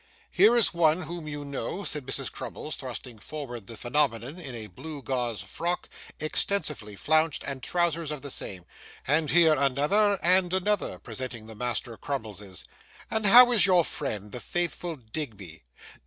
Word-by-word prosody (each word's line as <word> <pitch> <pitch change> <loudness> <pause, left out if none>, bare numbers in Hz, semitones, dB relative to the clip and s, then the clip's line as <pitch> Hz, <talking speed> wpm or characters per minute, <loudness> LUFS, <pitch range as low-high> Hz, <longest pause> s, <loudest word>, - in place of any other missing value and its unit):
'Here 235 - +6
is 230 - +3
one 170 0 +3
whom 165 0 -6
you 145 -1 -5
know,' 140 - -4
said 150 -7 -3
Mrs. 135 -1 -3
Crummles, 155 - -6
thrusting 125 -3 -8
forward 120 -6 -7
the 115 - -9
Phenomenon 130 +3 0
in 135 -8 -7
a 110 -2 -6
blue 140 - -8
gauze 120 -7 -2
frock, 170 - -3 0.3
extensively 150 - 0
flounced, 155 +6 +2
and 135 -1 -4
trousers 170 +1 0
of 150 -3 -5
the 140 - -4
same; 90 -7 -3 0.4
'and 150 +2 +2
here 165 -2 +6
another 150 +10 +3
and 180 0 +4
another,' 200 +1 0
presenting 125 -4 -7
the 110 - -9
Master 120 0 -2
Crummleses. 105 - -5 0.5
'And 220 -2 +1
how 245 +4 +9
is 205 -6 +5
your 180 -3 +5
friend, 105 -8 -4
the 125 - -6
faithful 175 +2 -1
Digby? 110 - -7
145 Hz, 155 wpm, -28 LUFS, 120-170 Hz, 0.5 s, how